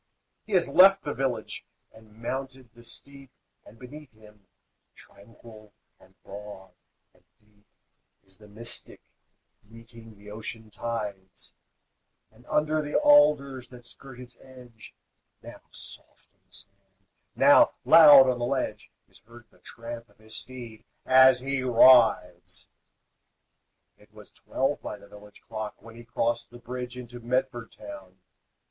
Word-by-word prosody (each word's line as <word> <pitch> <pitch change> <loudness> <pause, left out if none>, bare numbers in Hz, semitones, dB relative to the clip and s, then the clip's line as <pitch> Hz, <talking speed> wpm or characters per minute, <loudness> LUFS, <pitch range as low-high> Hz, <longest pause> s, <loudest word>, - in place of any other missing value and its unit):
He 215 - -7
has 180 -3 +2
left 195 +2 +6
the 145 - -4
village 135 -2 -4 0.3
and 110 -1 -20
mounted 130 -1 -6
the 120 - -17
steep, 140 +3 -12 0.4
And 110 - -17
beneath 140 +3 -13
him, 105 -2 -21 0.5
tranquil 110 0 -17 0.3
and - - -23
broad 100 -1 -11 0.4
and - - -30 0.2
deep, 105 -1 -33 0.6
Is 95 0 -19
the 105 - -16
Mystic, 115 +3 -7 0.6
meeting 115 0 -16
the 105 +1 -14
ocean 110 0 -8
tides; 105 -5 -7 0.8
And - - -23
under 155 +1 0
the 150 0 -6
alders, 150 - +3
that 125 -1 -15
skirt 125 +1 -13
its 125 -1 -13
edge, 125 -4 -16 0.5
Now - - -12
soft - - -7
on - - -43
the - - -31
sand, 100 -1 -17 0.3
now - - +5
loud 145 -5 +8
on 125 -1 -1
the 120 - -2
ledge, 125 -5 -3 0.2
Is - - -21
heard 115 +2 -17
the - - -26
tramp 115 0 -10
of 105 - -28
his 110 0 -11
steed 120 -4 -8 0.2
as 130 -1 +5
he 135 0 -3
rides. 130 0 +3 1.3
It - - -23
was - - -16
twelve 135 +2 -3
by 105 - -7
the 100 - -17
village 105 0 -16
clock 110 -1 -7
When 115 0 -15
he 120 - -12
crossed 115 0 -3
the 120 - -13
bridge 125 +1 -8
into 120 -1 -10
Medford 120 -1 -3
town. 100 -3 -12
120 Hz, 140 wpm, -26 LUFS, 105-130 Hz, 1.3 s, loud